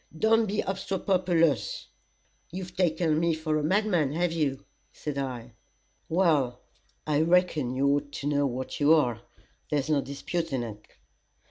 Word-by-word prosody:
Don't 225 Hz, +3 st, +3 dB
be 205 Hz, +2 st, 0 dB
obstropolous." 180 Hz, -, 0 dB, 0.7 s
"You've 180 Hz, 0 st, -7 dB
taken 165 Hz, -3 st, +1 dB
me 170 Hz, -1 st, +1 dB
up 160 Hz, -, -11 dB
for 155 Hz, -1 st, +1 dB
a -, -, -3 dB
madman, 175 Hz, -5 st, +1 dB
have 175 Hz, +1 st, 0 dB
you?" 145 Hz, -5 st, -1 dB, 0.3 s
said 145 Hz, -2 st, -5 dB
I. 125 Hz, -3 st, -5 dB, 0.6 s
"Well, 150 Hz, -8 st, +2 dB, 0.5 s
I 150 Hz, -1 st, +2 dB
reckon 160 Hz, -6 st, +2 dB
you 135 Hz, +2 st, +2 dB
ought 145 Hz, 0 st, 0 dB
to 140 Hz, -, -4 dB
know 145 Hz, -1 st, +2 dB
what 130 Hz, +1 st, -5 dB
you 150 Hz, +2 st, +6 dB
are. 120 Hz, -7 st, +1 dB, 0.5 s
There's 150 Hz, 0 st, 0 dB
no 145 Hz, -2 st, +3 dB
disputing 140 Hz, -1 st, -3 dB
it." 105 Hz, -2 st, -9 dB
155 Hz, 145 wpm, -27 LUFS, 140-175 Hz, 0.7 s, you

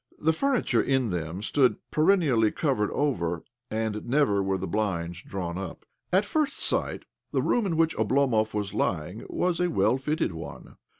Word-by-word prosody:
The 160 Hz, +1 st, +2 dB
furniture 245 Hz, -, +1 dB
in 130 Hz, -5 st, +1 dB
them 85 Hz, +2 st, -3 dB
stood 130 Hz, +3 st, +3 dB, 0.2 s
perennially 155 Hz, -, +3 dB
covered 130 Hz, -10 st, 0 dB
over, 85 Hz, -, -1 dB, 0.3 s
arid 110 Hz, 0 st, -2 dB
never 130 Hz, -7 st, +3 dB
were 95 Hz, 0 st, 0 dB
the 95 Hz, -, -4 dB
blinds 85 Hz, -3 st, -2 dB
drawn 90 Hz, -2 st, -4 dB
up. 95 Hz, -4 st, -7 dB, 0.3 s
At 190 Hz, +3 st, +3 dB
first 300 Hz, +4 st, 0 dB
sight -, -, -1 dB, 0.3 s
the -, -, +1 dB
room 235 Hz, -4 st, +2 dB
in 165 Hz, -3 st, -1 dB
which 165 Hz, 0 st, +2 dB
Oblomov 110 Hz, -1 st, +2 dB
was 100 Hz, -1 st, -2 dB
lying 90 Hz, +5 st, -2 dB
was 180 Hz, -1 st, 0 dB
a 180 Hz, 0 st, +2 dB
well 130 Hz, -5 st, +2 dB
fitted 150 Hz, -, 0 dB
one. 80 Hz, 0 st, -9 dB
110 Hz, 165 wpm, -27 LUFS, 95-155 Hz, 0.3 s, stood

